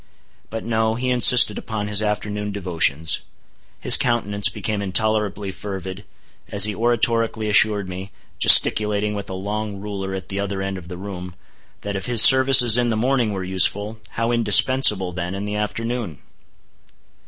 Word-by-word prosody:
But 115 Hz, 0 st, -8 dB
no; 110 Hz, -1 st, -2 dB
he 125 Hz, +2 st, -4 dB
insisted 125 Hz, -3 st, +5 dB
upon 105 Hz, -2 st, -7 dB
his 105 Hz, 0 st, +2 dB
afternoon 105 Hz, 0 st, -5 dB
devotions. 80 Hz, -5 st, -1 dB, 0.6 s
His -, -, +7 dB
countenance 105 Hz, -4 st, -1 dB
became 105 Hz, -2 st, -6 dB
intolerably 105 Hz, 0 st, -1 dB
fervid, 95 Hz, 0 st, -9 dB, 0.4 s
as 100 Hz, -1 st, +4 dB
he 105 Hz, -, -3 dB
oratorically 115 Hz, 0 st, -2 dB
assured 105 Hz, -1 st, +1 dB
me—gesticulating 100 Hz, +3 st, +2 dB
with 100 Hz, -1 st, -8 dB
a 95 Hz, -, -7 dB
long 105 Hz, +2 st, -6 dB
ruler 95 Hz, -2 st, -7 dB
at 95 Hz, -1 st, -10 dB
the 100 Hz, -, -6 dB
other 100 Hz, -1 st, -5 dB
end 95 Hz, 0 st, -6 dB
of 85 Hz, -, -16 dB
the 90 Hz, 0 st, -10 dB
room—that 95 Hz, +1 st, -12 dB
if 95 Hz, -, -6 dB
his 120 Hz, -2 st, +6 dB
services 130 Hz, -3 st, +5 dB
in 120 Hz, -1 st, -1 dB
the 110 Hz, -, -3 dB
morning 125 Hz, -1 st, -2 dB
were 95 Hz, -2 st, -6 dB
useful, 100 Hz, +4 st, -2 dB
how 115 Hz, +1 st, -3 dB
indispensable, 110 Hz, -3 st, +4 dB
then, 90 Hz, +1 st, -6 dB
in 100 Hz, +1 st, -7 dB
the 105 Hz, 0 st, -6 dB
afternoon? 110 Hz, -, -6 dB
105 Hz, 150 wpm, -19 LUFS, 95-110 Hz, 0.6 s, His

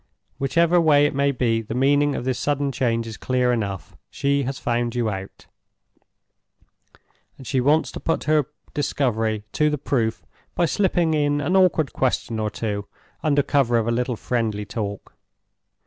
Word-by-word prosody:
Whichever 170 Hz, +5 st, +3 dB
way 145 Hz, -3 st, +5 dB
it 145 Hz, -, 0 dB
may 140 Hz, 0 st, +2 dB
be, 120 Hz, -3 st, 0 dB
the 110 Hz, +1 st, -6 dB
meaning 145 Hz, +2 st, +3 dB
of 120 Hz, -, -4 dB
this 130 Hz, -1 st, -1 dB
sudden 145 Hz, -1 st, 0 dB
change 115 Hz, -3 st, 0 dB
is 110 Hz, -2 st, -7 dB
clear 125 Hz, -1 st, +1 dB
enough. 100 Hz, -7 st, -4 dB
She 140 Hz, 0 st, 0 dB
has 135 Hz, +1 st, -3 dB
found 120 Hz, -2 st, -1 dB
you 115 Hz, -3 st, 0 dB
out; 95 Hz, -1 st, -8 dB, 1.9 s
and 130 Hz, -, -12 dB
she 130 Hz, +1 st, 0 dB
wants 150 Hz, +5 st, +2 dB
to -, -, -7 dB
put 165 Hz, -, -1 dB
her 150 Hz, -2 st, +2 dB, 0.3 s
discovery 115 Hz, -7 st, -1 dB
to 150 Hz, 0 st, +2 dB
the 150 Hz, -, -1 dB
proof 120 Hz, -5 st, -1 dB, 0.3 s
by 175 Hz, -, +2 dB
slipping 175 Hz, -3 st, +1 dB
in 145 Hz, -1 st, +1 dB
an 150 Hz, +6 st, 0 dB
awkward 180 Hz, -6 st, +3 dB
question 120 Hz, -3 st, -1 dB
or 110 Hz, -1 st, -1 dB
two, 105 Hz, -2 st, -4 dB, 0.3 s
under 145 Hz, -2 st, +2 dB
cover 135 Hz, -4 st, +2 dB
of 115 Hz, -1 st, 0 dB
a -, -, +1 dB
little 125 Hz, +1 st, -1 dB
friendly 110 Hz, -3 st, -2 dB
talk. 100 Hz, -1 st, -5 dB
130 Hz, 165 wpm, -23 LUFS, 115-145 Hz, 1.9 s, way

